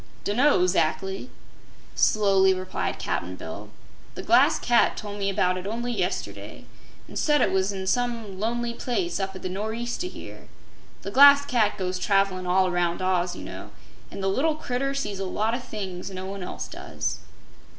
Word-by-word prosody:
"Dun'no, 215 -2 +3
zac'ly," 190 +5 0 0.6
slowly 195 -3 +4
replied 185 0 -3
Cap'n 90 +2 -3
Bill. 100 +5 -8 0.5
"The - - -6
Glass - - +5
Cat 240 -1 +3
tol' 205 -1 -6
me 200 -1 -1
about 185 -1 +1
it 185 - -6
only 235 +3 -2
yesterday, 185 -3 -4 0.4
an' - - -8
said 295 -1 +3
it - - +2
was 190 +1 +1
in 190 -1 -5
some 230 -3 -1
lonely 235 +2 -1
place 260 - -2
up 195 0 -3
at 185 - -9
the - - -2
nor'east 220 - -3
o' 360 - -3
here. - - -11 0.6
The 200 - -5
Glass 280 +3 +8
Cat 220 -6 +1
goes 185 -1 -2
travelin' 195 -2 +1
all 185 +1 +3
around 175 -1 0
Oz, 180 -1 +1
you - - -8
know, - - -8 0.4
an' 195 - -7
the 195 - 0
little 290 +11 +1
critter 275 -2 -2
sees 210 -8 -3
a 195 - -2
lot 215 +4 -1
o' 240 - -1
things 195 -6 -6
no 185 -1 -6
one 195 0 -6
else 180 - -5
does." - - -4
195 Hz, 175 wpm, -25 LUFS, 185-240 Hz, 0.6 s, Glass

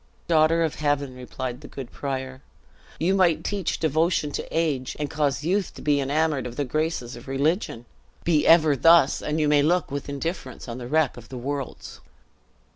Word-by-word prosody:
"Daughter 165 0 +4
of 160 - 0
heaven," 145 -3 0
replied 125 0 -6
the 145 - -10
good 130 -3 -8
prior, 130 -1 -5 0.6
"you 175 +4 +2
might 180 -4 +3
teach 200 -4 -2
devotion 160 0 +1
to - - -4
age, 150 -6 -1
and 150 -1 -3
cause 145 -2 0
youth 185 +3 0
to - - -10
be 145 -1 +2
enamored 145 -1 0
of 120 - -8
the 145 - -1
graces 155 -3 -2
of 120 +2 -12
religion! 135 - -1 0.4
Be 155 -3 +2
ever 160 -3 +6
thus, 165 0 +5
and 150 +1 -2
you 150 - +2
may 145 -1 +4
look 170 +1 +1
with 140 0 -4
indifference 140 -2 -5
on 120 +1 -6
the 120 - -6
wreck 155 -1 +1
of 115 +1 -12
worlds." 135 +2 -5
145 Hz, 180 wpm, -25 LUFS, 130-160 Hz, 0.6 s, ever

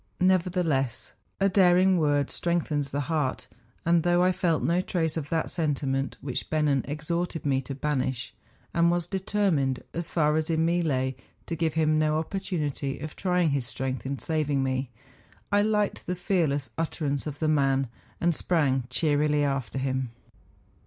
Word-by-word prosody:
Nevertheless 180 -8 +1 0.3
a 195 - +4
daring 185 -1 +5
word 145 -3 +2
o - - -8
strengthens 155 -5 -1
the 140 +2 -1
heart, 145 -2 -1 0.4
and 170 0 +4
though 175 +1 +3
I 185 - +4
felt 175 -3 0
no 175 +2 +2
trace 165 -4 -1
of 150 -3 -4
that 160 -1 -1
sentiment 140 -4 -1
which 135 -3 -4
Bennen 150 -3 +2
exhorted 160 +3 -3
me 135 -2 +2
to 135 +1 -6
banish, 130 -3 -2 0.4
and 170 0 +4
was 175 -1 +1
determined, 185 -8 0
as 170 -1 -3
far 150 -2 +2
as 160 0 -1
in 160 0 +2
me 175 +1 +2
lay, 130 -5 0 0.3
to 165 - -3
give 160 -1 -1
him 155 -1 +3
no 155 0 +2
opportunity 155 -5 -2
of 155 +1 -7
trying 180 -4 +1
his 135 -4 -1
strength 130 0 -3
in 140 0 -2
saving 150 -3 0
me, 130 -1 -1 0.6
I 205 0 +4
liked 210 -1 0
the 180 - -1
fearless 165 -7 0
utterance 150 -3 -1
of 145 -1 -5
the 155 - 0
man, 135 -3 +2 0.3
and 170 0 +2
sprang 145 -7 +1
cheerily 150 +1 +2
after 135 -2 -1
him. 130 -1 -1
155 Hz, 165 wpm, -27 LUFS, 140-170 Hz, 0.6 s, daring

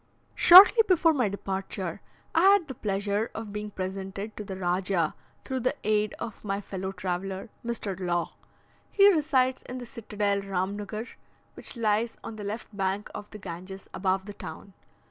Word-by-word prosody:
Shortly 390 +6 +10
before 335 -3 +4
my 250 -8 +1
departure 195 -2 -4 0.3
I 325 - +4
had 390 -2 +5
the 265 - -5
pleasure 205 0 -1
of 220 -2 -6
being 210 0 -4
presented 195 +2 -5
to 210 - -6
the 190 -2 -6
Rajah 180 -2 0 0.3
through 260 -1 -2
the 255 +4 0
aid 210 0 +1
of 225 - -7
my 200 -1 -2
fellow 190 -1 -5
traveller, 190 +2 -4
Mr. 230 -5 -3
Law. 175 -2 -1 0.6
He 400 0 +6
resides 265 -5 +2
in 250 - -7
the 245 - -6
Citadel 210 -3 -2
Rhamnughur, 200 +4 -4 0.4
which - - -7
lies 225 +1 +1
on 225 - -7
the 210 - -7
left 210 +1 -6
bank 195 +1 -2
of 205 - -8
the 215 - -9
Ganges, 185 0 -8
above 190 0 0
the 205 - -7
town. 200 0 -9
205 Hz, 165 wpm, -27 LUFS, 190-230 Hz, 0.6 s, Shortly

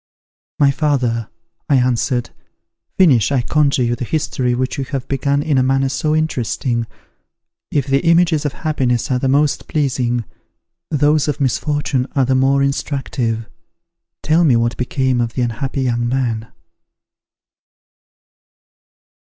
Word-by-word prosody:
"My 140 -1 +4
father," 125 -7 0 0.4
I 145 - +4
answered, 125 0 0 0.7
"finish, 145 - +4
I 130 -3 +1
conjure 140 -1 +2
you, 120 0 0
the 125 - -5
history 125 -3 -1
which 130 +2 -2
you - - 0
have 135 -1 -5
begun 140 +1 0
in 145 -4 +1
a - - +3
manner 135 +1 +1
so 150 +3 0
interesting. 125 -5 -1 0.8
If 140 -3 0
the 135 0 +2
images 165 -2 +3
of 145 -2 -2
happiness 135 -4 -1
are 125 - +1
the 135 - -1
most 145 +2 +1
pleasing, 125 -5 -1 0.6
those 150 0 +2
of 150 - -2
misfortune 140 -1 0
are 135 -2 +3
the 130 - +1
more 135 +1 +3
instructive. 130 -5 -2 0.8
Tell 160 +3 +3
me 140 -7 +4
what 115 0 +1
became 130 0 0
of 115 -1 -2
the 125 - -1
unhappy 130 +4 -3
young 120 -1 0
man." 120 -3 -1
135 Hz, 135 wpm, -18 LUFS, 120-145 Hz, 0.8 s, My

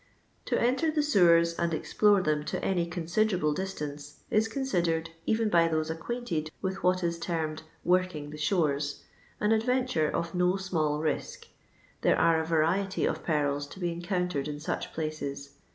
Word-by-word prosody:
'* - - -39
To - - +1
enter 260 +7 +2
the 305 -1 +1
sewers 170 - +5
and 170 -1 +1
explore 205 +3 +3
them 150 -2 +1
to - - -2
nny 175 -3 0
considerable 175 -1 +1
distance 150 -5 -5
is 215 +1 +3
considered, 175 -10 -1 0.2
even 225 0 +2
by 170 -4 +4
those 155 -1 -1
acquainted 165 -2 -3
with 190 0 -3
what 185 0 +2
is 170 -1 -1
termed 160 -2 -2 0.2
"working 180 -5 +1
the 150 - -8
shores," 150 -4 0 0.4
an 210 +1 +2
adventure 230 -7 +1
of 170 -1 -2
no 180 +1 +2
small 160 -6 -1
risk. 155 - -3 0.5
There - - +3
are 165 -1 +4
a - - -3
variety 170 +4 +1
of - - -2
perils 145 -3 0
to 190 - -12
be 175 -2 -1
encountered 175 -4 -2
in 145 -1 -5
such 150 - -3
places. 140 -3 -4
170 Hz, 165 wpm, -29 LUFS, 155-190 Hz, 0.5 s, sewers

